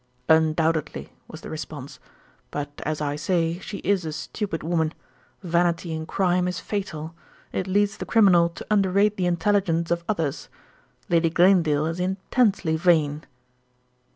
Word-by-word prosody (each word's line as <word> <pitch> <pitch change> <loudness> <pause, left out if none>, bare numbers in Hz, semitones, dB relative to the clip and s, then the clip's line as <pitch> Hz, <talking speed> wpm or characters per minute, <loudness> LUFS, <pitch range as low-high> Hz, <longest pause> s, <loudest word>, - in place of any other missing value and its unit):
"Undoubtedly," 160 0 +1
was - - -10
the - - -9
response; - - -7 0.5
"but 145 0 -4 0.2
as 155 -1 -2
I 145 -1 -1
say, 165 +1 0
she 200 - -7
is 200 -2 +2
a 160 - -4
stupid 180 +2 -4
woman. 160 -1 0 0.5
Vanity 170 -1 0
in 160 0 -5
crime 180 -1 +1
is 180 - -3
fatal; 165 -6 -5 0.4
it 185 - -2
leads 200 +1 +1
the - - -6
criminal 185 -7 +5
to 170 - -10
underrate 200 +1 +3
the 180 -2 0
intelligence 175 -2 +1
of 170 0 0
others. 165 -9 -2 0.6
Lady 165 -1 +3
Glanedale 165 -4 +3
is 165 +2 -3
intensely 190 -1 +1
vain." 155 -3 +2
170 Hz, 140 wpm, -24 LUFS, 160-190 Hz, 0.6 s, criminal